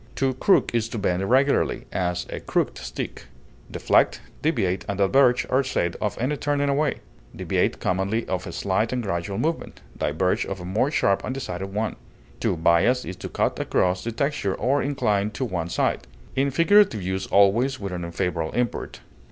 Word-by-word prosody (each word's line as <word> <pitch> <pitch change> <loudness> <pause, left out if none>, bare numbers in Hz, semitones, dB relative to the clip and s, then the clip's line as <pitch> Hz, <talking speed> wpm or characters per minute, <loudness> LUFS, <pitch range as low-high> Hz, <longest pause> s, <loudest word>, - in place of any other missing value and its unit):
To 135 -1 +1
crook 160 +5 +3
is 115 -1 0
to 115 - -5
bend 90 -3 0
irregularly, 130 +7 +2
as 90 -1 -1
a - - -4
crooked - - -1
stick. - - -6 0.4
Deflect, - - +2 0.2
deviate, 100 - 0
and 100 - -2
diverge 125 +5 +4
are 130 +2 +2
said 85 -9 -1
of 105 - -1
any 135 +5 0
turning 145 0 0
away; 145 +1 0 0.3
deviate - - 0
commonly 95 +5 -1
of 95 -1 -3
a - - -5
slight 100 +3 0
and 125 -1 -1
gradual 95 0 -3
movement, 165 +1 -2
diverge 85 +5 0
of 95 - -5
a 90 - -7
more 105 +9 +1
sharp 100 -9 +1
and 130 - -3
decided 95 -7 -5
one. 105 +1 -2 0.4
To - - 0
bias 85 +10 +3
is 95 - -5
to - - -7
cut - - -1
across 90 0 +1
the 115 - -3
texture, 140 -5 -1
or 135 +3 +1
incline 115 -8 0
to 130 - -2
one 85 -7 -3
side; - - -1 0.3
in 135 +1 +2
figurative 165 - +4
use 95 +1 -2
always 115 +7 +3
with 100 -2 -5
an 90 -1 -4
unfavorable 85 -1 -2
import. 120 -1 -2
105 Hz, 175 wpm, -24 LUFS, 95-130 Hz, 0.4 s, diverge